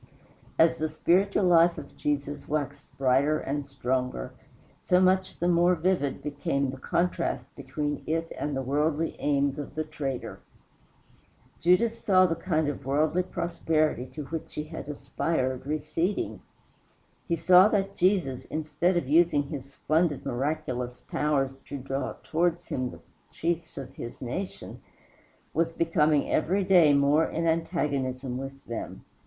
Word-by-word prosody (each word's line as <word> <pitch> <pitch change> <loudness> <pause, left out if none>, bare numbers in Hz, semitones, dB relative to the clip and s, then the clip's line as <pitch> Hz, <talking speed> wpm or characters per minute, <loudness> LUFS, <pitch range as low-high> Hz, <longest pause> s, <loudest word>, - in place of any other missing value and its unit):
As 165 0 +4
the 155 0 0
spiritual 190 +6 +2
life 170 -1 +5
of 145 -2 -9
Jesus 145 0 -2
waxed 145 -2 -3
brighter 135 +3 +3
and 145 0 -3
stronger, 125 - -2 0.5
so 180 - +3
much 185 0 +2
the 175 - 0
more 175 +1 +4
vivid 170 -5 0
became 140 -2 -1
the 135 - -8
contrast 170 +3 -1
between 145 -1 -3
it 165 +1 -1
and 145 -2 -3
the 135 - -2
worldly 150 +4 0
aims 140 0 +1
of 145 - -7
the 155 - -1
traitor. 140 -4 -5 1.2
Judas 220 +7 +3
saw 185 -2 +5
the 170 - +1
kind 160 -3 0
of 145 - -4
worldly 155 +6 +2
prosperity 165 -6 -1
to 150 +3 -7
which 160 +2 -6
he 150 - -2
had 155 -1 -8
aspired 135 -2 -2
receding. 155 +6 -2 0.9
He 170 - +1
saw 180 +3 +7
that 195 -2 0
Jesus, 180 -10 +1
instead 155 +3 0
of 145 - -1
using 155 -1 +4
his 140 -2 -7
splendid 155 0 0
miraculous 125 -2 -2
powers 135 -3 -1
to 140 - -4
draw 135 +1 -3
towards 175 +1 0
him 130 -1 -1
the - - -12 0.3
chiefs 170 0 -3
of 135 -2 -7
his 120 - -8
nation, 155 +10 -5 0.7
was 165 +1 +1
becoming 155 -3 +2
every 190 +6 +1
day 180 -5 +6
more 145 +3 +4
in 165 +1 -2
antagonism 140 -6 -1
with 135 0 -8
them. 120 - -6
155 Hz, 140 wpm, -27 LUFS, 140-170 Hz, 1.2 s, saw